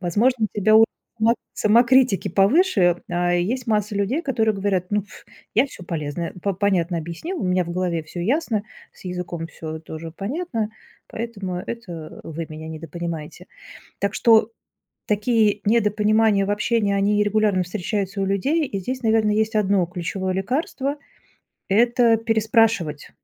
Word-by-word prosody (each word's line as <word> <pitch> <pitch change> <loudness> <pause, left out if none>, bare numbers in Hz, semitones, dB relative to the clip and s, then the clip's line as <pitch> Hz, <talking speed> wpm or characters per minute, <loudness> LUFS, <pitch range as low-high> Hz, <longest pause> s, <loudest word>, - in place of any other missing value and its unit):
Возможно, 220 +6 +2
у - - -15
тебя 215 +2 +5
у 225 - +8 0.3
само 230 +2 +4 0.2
самокритики 235 -2 +4
повыше. 195 - +3
А 175 0 +1
есть 235 +8 -1
масса 210 -1 0
людей, 235 - 0
которые 225 -7 +1
говорят: 195 -2 -1
"Ну, 205 -1 +1
ф, 205 - -15 0.3
я 245 +6 +4
всё 185 -8 -12
полезное, 165 0 -4
п 200 -2 0
понятно 180 -3 +1
объяснил, 170 - -5
у - - -2
меня 180 0 +1
в 170 - -7
голове 175 -2 -1
всё 170 +3 -8
ясно, 230 - 0 0.3
с - - -19
языком 180 -2 -4
всё 160 0 -7
тоже 160 0 -8
понятно, 225 - -3 0.4
поэтому 205 -6 -5
это 180 -6 -7
вы 165 0 -6
меня 155 +1 -8
недопонимаете". 160 0 -6 0.5
Так 200 +1 -1
что 225 -1 +4 0.6
такие 210 0 +2
недопонимания 210 -1 +3
в - - -2
общении, 210 -1 +1
они 205 +1 +2
регулярно 205 -3 +2
встречаются 195 +2 -3
у - - +1
людей. 275 - +1
И 200 - -4
здесь, 255 +7 -4
наверное, 220 -2 +2
есть 220 +1 0
одно 200 -3 +3
ключевое 185 +2 -3
лекарство- 265 - -2 0.7
это 235 +3 +4
переспрашивать. 220 -8 +1
205 Hz, 145 wpm, -22 LUFS, 180-225 Hz, 0.7 s, у